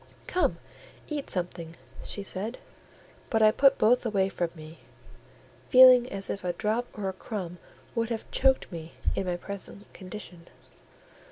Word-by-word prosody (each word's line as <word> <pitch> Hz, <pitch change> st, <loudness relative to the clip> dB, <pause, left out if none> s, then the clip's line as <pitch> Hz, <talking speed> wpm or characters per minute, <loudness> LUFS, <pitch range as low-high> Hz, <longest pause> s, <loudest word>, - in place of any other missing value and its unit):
"Come, 365 Hz, -, +1 dB, 0.5 s
eat 295 Hz, -3 st, -4 dB
something," 170 Hz, -2 st, -4 dB, 0.3 s
she 200 Hz, -, -5 dB
said; 205 Hz, +5 st, -5 dB, 0.7 s
but 220 Hz, -2 st, +3 dB
I 215 Hz, -, +7 dB
put 275 Hz, +4 st, +4 dB
both 245 Hz, +3 st, +4 dB
away 200 Hz, -5 st, +1 dB
from 175 Hz, -2 st, -2 dB
me, 155 Hz, +1 st, -11 dB, 0.9 s
feeling 255 Hz, -1 st, +8 dB
as 195 Hz, 0 st, -5 dB
if 200 Hz, -, -4 dB
a 180 Hz, -1 st, -1 dB
drop 220 Hz, +6 st, -1 dB
or 200 Hz, -2 st, -2 dB
a 190 Hz, -, -2 dB
crumb 185 Hz, -3 st, -6 dB, 0.3 s
would 230 Hz, -1 st, -1 dB
have 225 Hz, -2 st, -3 dB
choked 265 Hz, -4 st, +2 dB
me 165 Hz, -1 st, -8 dB, 0.2 s
in 190 Hz, -, -2 dB
my 175 Hz, -1 st, -1 dB
present 200 Hz, +2 st, -8 dB
condition. 185 Hz, -3 st, -9 dB
200 Hz, 150 wpm, -28 LUFS, 180-235 Hz, 0.9 s, feeling